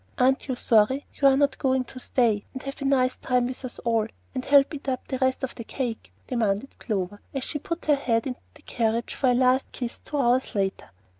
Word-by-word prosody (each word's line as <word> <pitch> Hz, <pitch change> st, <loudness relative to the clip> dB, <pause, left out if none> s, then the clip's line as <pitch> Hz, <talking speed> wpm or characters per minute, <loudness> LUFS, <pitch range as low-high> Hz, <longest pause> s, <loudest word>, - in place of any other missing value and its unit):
"Aren't 265 Hz, +3 st, +2 dB
you 260 Hz, -, -1 dB
sorry 245 Hz, +4 st, +3 dB
you 275 Hz, -, +3 dB
are 270 Hz, -1 st, +5 dB
not 285 Hz, -1 st, +2 dB
going 260 Hz, -1 st, +2 dB
to 255 Hz, +1 st, -11 dB
stay 230 Hz, -5 st, +1 dB
and 260 Hz, -, -6 dB
have 275 Hz, +1 st, -6 dB
a -, -, -2 dB
nice 255 Hz, -2 st, +2 dB
time 250 Hz, -1 st, +1 dB
with 255 Hz, +2 st, -5 dB
us 255 Hz, -, -6 dB
all, 225 Hz, -2 st, +2 dB, 0.3 s
and 255 Hz, -1 st, -3 dB
help 280 Hz, +2 st, +5 dB
eat 280 Hz, -2 st, -4 dB
up 255 Hz, -1 st, -3 dB
the 260 Hz, -, -3 dB
rest 260 Hz, 0 st, +1 dB
of 265 Hz, -, -2 dB
the 230 Hz, -, -7 dB
cake?" 235 Hz, -1 st, -4 dB
demanded 225 Hz, 0 st, -1 dB
Clover, 205 Hz, -2 st, -3 dB
as 270 Hz, -, -1 dB
she 295 Hz, -, -4 dB
put 335 Hz, +3 st, -5 dB
her 300 Hz, -, +5 dB
head 235 Hz, -5 st, +1 dB
into 255 Hz, -2 st, -4 dB, 0.2 s
the 295 Hz, -, -18 dB
carriage 230 Hz, 0 st, -1 dB
for 260 Hz, -, +1 dB
a 245 Hz, -, +4 dB
last 255 Hz, +1 st, +3 dB
kiss, 245 Hz, -2 st, -5 dB
two 295 Hz, -, -5 dB
hours 255 Hz, -2 st, +2 dB
later. 195 Hz, -1 st, -1 dB
255 Hz, 230 wpm, -26 LUFS, 235-270 Hz, 0.3 s, are